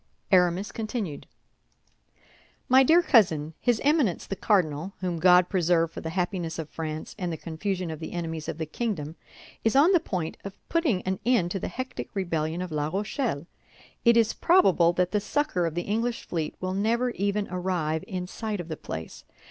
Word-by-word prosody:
Aramis 180 +1 +3
continued: 215 - -4 1.4
"MY 260 +1 +7
DEAR 330 +6 +5
COUSIN, 160 - +3
His 240 -3 +2
Eminence, 285 - +2
the 195 - -4
cardinal, 180 -3 +1
whom 180 -3 -2
God 180 +1 +6
preserve 170 -3 +2
for - - -7
the 160 - -4
happiness 175 -1 -2
of 160 -2 -6
France 155 -1 -5
and 180 -2 -2
the 160 - -4
confusion 180 +2 -3
of 155 - -6
the 160 - -6
enemies 165 -2 -4
of - - -4
the 160 - -3
kingdom, 160 -4 -3 0.5
is 225 - +2
on 300 +7 +6
the 360 - +5
point 180 - -4
of 195 -1 -8
putting 295 - +1
an 190 0 -2
end 230 -9 +2
to 195 - -2
the - - -3
hectic 255 0 -5
rebellion 165 -2 -1
of 180 - -7
La 150 -1 -1
Rochelle. 200 - -2 0.6
It 235 -1 +5
is 225 -1 +3
probable 190 - +4
that 180 0 +1
the 210 - +2
succor 205 - 0
of 165 - -5
the 175 - -1
English 230 +4 -2
fleet 160 -3 -3
will 185 0 -2
never 230 +5 +1
even 200 0 -1
arrive 175 -4 -1
in 185 -4 -4
sight 210 +2 -4
of 175 -1 -6
the 160 - -4
place. 80 - -7
185 Hz, 185 wpm, -27 LUFS, 165-220 Hz, 1.4 s, MY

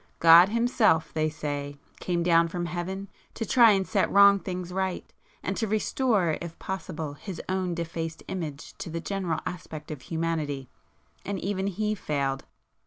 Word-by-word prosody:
God 170 +3 +8
Himself, 230 -7 +2
they 155 0 +1
say, 145 -2 -4 0.2
came 175 -1 -1
down 170 -1 +4
from 175 +1 -3
Heaven 180 +3 -4 0.3
to 225 - -3
try 235 +1 +6
and 195 -1 0
set - - +1
wrong 200 0 +7
things 180 -2 -5
right, 190 -1 -2 0.4
and - - -2
to 225 - 0
restore 210 - +1
if 170 -1 -7
possible 165 -5 -5
His 170 +5 -8
own 185 -2 -1
defaced 165 -1 -4
image 155 -6 -5
to - - -5
the 165 +1 -3
general 180 -3 -2
aspect 160 -4 -6
of 150 -4 -6
humanity,—and 160 +4 -5
even 195 +1 -2
He 210 +2 -1
failed." 140 -8 -2
175 Hz, 155 wpm, -27 LUFS, 160-195 Hz, 0.4 s, God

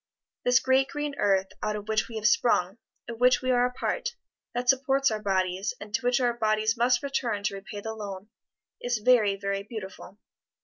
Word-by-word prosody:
This 250 +1 +4
great 260 +1 +2
green 295 0 -4
earth 195 -2 +2
out 210 0 -1
of 210 0 -7
which 220 0 0
we 230 - -10
have 215 -1 -4
sprung, 215 -2 +2 0.3
of 230 -1 -7
which 250 +1 +4
we 255 - +1
are 245 0 +3
a - - -7
part, 485 - -3 0.4
that 245 +1 -2
supports 270 0 +3
our 215 -1 -3
bodies, 190 -1 -1
and 205 0 -10
to 230 - +1
which 245 0 +2
our 245 -2 +2
bodies 220 -1 +1
must 245 +2 +2
return 245 -7 -2
to 205 - -1
repay 200 +1 -7
the 220 +1 -5
loan, 200 -2 -7 0.5
is 245 -1 0
very, 215 -3 +4
very 195 0 -3
beautiful. 200 -2 -9
220 Hz, 195 wpm, -27 LUFS, 205-250 Hz, 0.5 s, This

